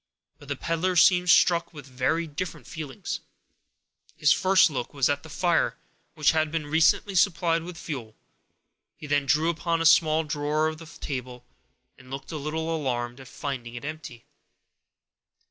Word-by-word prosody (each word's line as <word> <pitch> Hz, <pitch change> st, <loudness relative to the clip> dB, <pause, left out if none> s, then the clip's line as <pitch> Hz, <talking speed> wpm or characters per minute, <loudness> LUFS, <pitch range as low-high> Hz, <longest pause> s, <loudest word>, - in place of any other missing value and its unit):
But 145 Hz, -, -14 dB
the 145 Hz, -, -2 dB
peddler 165 Hz, +6 st, -1 dB
seemed 180 Hz, +1 st, +5 dB
struck 170 Hz, -1 st, +4 dB
with 145 Hz, -2 st, -9 dB
very 135 Hz, +6 st, -1 dB
different 160 Hz, +3 st, -6 dB
feelings. 150 Hz, -5 st, -6 dB, 1.0 s
His 150 Hz, -1 st, +4 dB
first 190 Hz, -1 st, +4 dB
look 130 Hz, +1 st, -5 dB
was 135 Hz, -3 st, +2 dB
at 145 Hz, 0 st, 0 dB
the 160 Hz, -, -13 dB
fire, 170 Hz, +1 st, +1 dB, 0.4 s
which 155 Hz, -2 st, +3 dB
had 155 Hz, -1 st, 0 dB
been 160 Hz, -2 st, -2 dB
recently 160 Hz, +6 st, +2 dB
supplied 170 Hz, -3 st, +2 dB
with 170 Hz, +1 st, -8 dB
fuel; 130 Hz, -10 st, -7 dB, 0.8 s
he -, -, -10 dB
then 145 Hz, -1 st, 0 dB
drew 155 Hz, +4 st, +3 dB
open 170 Hz, 0 st, -1 dB
a 165 Hz, -, -1 dB
small 160 Hz, -1 st, +5 dB
drawer 150 Hz, 0 st, 0 dB
of 155 Hz, 0 st, -4 dB
the 165 Hz, -, -11 dB
table, 125 Hz, -5 st, -7 dB, 0.5 s
and 130 Hz, -1 st, -16 dB
looked 135 Hz, +1 st, -7 dB
a 160 Hz, -, -4 dB
little 160 Hz, +2 st, -2 dB
alarmed 120 Hz, -4 st, -3 dB
at 130 Hz, -, -12 dB
finding 120 Hz, -4 st, -6 dB
it 120 Hz, -, -7 dB
empty. 155 Hz, -6 st, -8 dB
155 Hz, 160 wpm, -26 LUFS, 140-165 Hz, 1.0 s, seemed